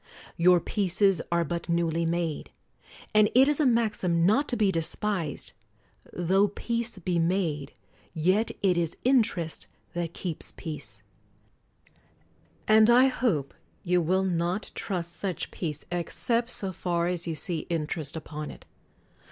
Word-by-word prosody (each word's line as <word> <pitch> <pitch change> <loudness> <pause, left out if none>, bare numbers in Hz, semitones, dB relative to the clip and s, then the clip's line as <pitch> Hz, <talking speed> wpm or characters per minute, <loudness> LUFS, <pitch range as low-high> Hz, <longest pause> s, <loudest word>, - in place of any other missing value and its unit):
Your 180 +1 +5
peaces 195 +1 +1
are 170 0 +2
but 170 +2 -4
newly 170 -1 +1
r - - 0
made. 170 -3 -2 0.6
And 210 0 +5
it 265 +2 +7
is 295 0 +1
a 300 - +4
maxim 210 -8 +1
not 240 +10 +3
to 245 - +1
be 205 -3 +3
despised, 165 -1 -1 0.6
"Tho 190 +4 +2
peace 235 +2 -3
be 175 -1 -1
made, 165 -5 -1 0.4
yet 185 +8 +1
it 185 -3 +3
is 165 -2 -2
interest 215 - +1 0.3
that 170 -1 -4
keeps 175 -4 -2
peace"; 125 -10 -4 0.8
— - - -30
and 220 +1 +6
I 250 +3 +6
hope 180 - -1 0.3
you 180 -1 +2
will 185 +4 +1
not 175 +2 -1
trust 175 -4 -4
such 180 0 -4
peace 150 -4 -4
except 230 +7 0
so 195 -6 -2
far 170 -1 -1
as 175 -1 -2
you 165 - -2
see 165 +2 -1
inter 160 -1 -2
est 145 0 -3
upon 150 -1 -6
it. - - -12
175 Hz, 145 wpm, -27 LUFS, 165-210 Hz, 0.8 s, it